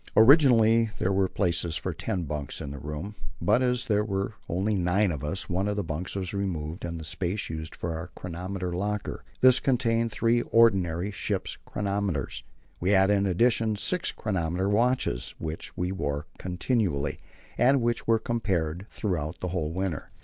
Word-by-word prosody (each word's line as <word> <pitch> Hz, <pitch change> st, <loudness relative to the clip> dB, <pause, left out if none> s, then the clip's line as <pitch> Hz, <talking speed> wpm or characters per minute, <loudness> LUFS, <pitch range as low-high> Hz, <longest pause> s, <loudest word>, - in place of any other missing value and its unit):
Originally 115 Hz, -3 st, +6 dB
there 95 Hz, -, +1 dB
were 95 Hz, 0 st, +3 dB
places 85 Hz, -3 st, 0 dB
for -, -, -3 dB
ten 90 Hz, -2 st, -2 dB
bunks 75 Hz, -2 st, -4 dB
in 70 Hz, -3 st, -5 dB
the 70 Hz, -, -7 dB
room, 75 Hz, +8 st, -5 dB, 0.3 s
but 125 Hz, -, +3 dB
as 125 Hz, -1 st, +1 dB
there 105 Hz, -1 st, +2 dB
were 100 Hz, 0 st, -2 dB, 0.2 s
only 95 Hz, +5 st, 0 dB
nine 95 Hz, +1 st, +2 dB
of 75 Hz, -4 st, -5 dB
us, 85 Hz, +6 st, -2 dB
one 95 Hz, +3 st, 0 dB
of 105 Hz, -, 0 dB
the 105 Hz, -, -1 dB
bunks 80 Hz, +3 st, -4 dB
was 95 Hz, -1 st, -3 dB
removed 85 Hz, -4 st, -3 dB
and 85 Hz, -1 st, -4 dB
the -, -, -7 dB
space 90 Hz, +5 st, -2 dB
used 80 Hz, 0 st, -6 dB
for 85 Hz, -, -3 dB
our 80 Hz, +2 st, -5 dB
chronometer 90 Hz, +1 st, -4 dB
locker. 105 Hz, +3 st, -3 dB, 0.2 s
This 130 Hz, -1 st, +7 dB
contained 115 Hz, -3 st, +1 dB
three 115 Hz, +2 st, +2 dB
ordinary 95 Hz, -6 st, +3 dB
ship's -, -, -3 dB
chronometers. 100 Hz, -8 st, -2 dB, 0.4 s
We 90 Hz, -, 0 dB
had, 95 Hz, 0 st, +5 dB
in 100 Hz, -1 st, +3 dB
addition, 110 Hz, +3 st, +2 dB
six 175 Hz, -, -1 dB
chronometer 90 Hz, -2 st, -1 dB
watches, 110 Hz, -, +1 dB
which 80 Hz, +3 st, -6 dB
we 90 Hz, 0 st, -1 dB
wore 75 Hz, -5 st, -2 dB
continually, 90 Hz, -, -1 dB, 0.4 s
and 135 Hz, +3 st, +4 dB
which 120 Hz, -1 st, -1 dB
were 115 Hz, -1 st, +5 dB
compared 95 Hz, -6 st, -1 dB
throughout 85 Hz, -5 st, -3 dB
the 90 Hz, -, -3 dB
whole 85 Hz, -3 st, -2 dB
winter. 90 Hz, -3 st, -3 dB
95 Hz, 170 wpm, -27 LUFS, 85-110 Hz, 0.4 s, This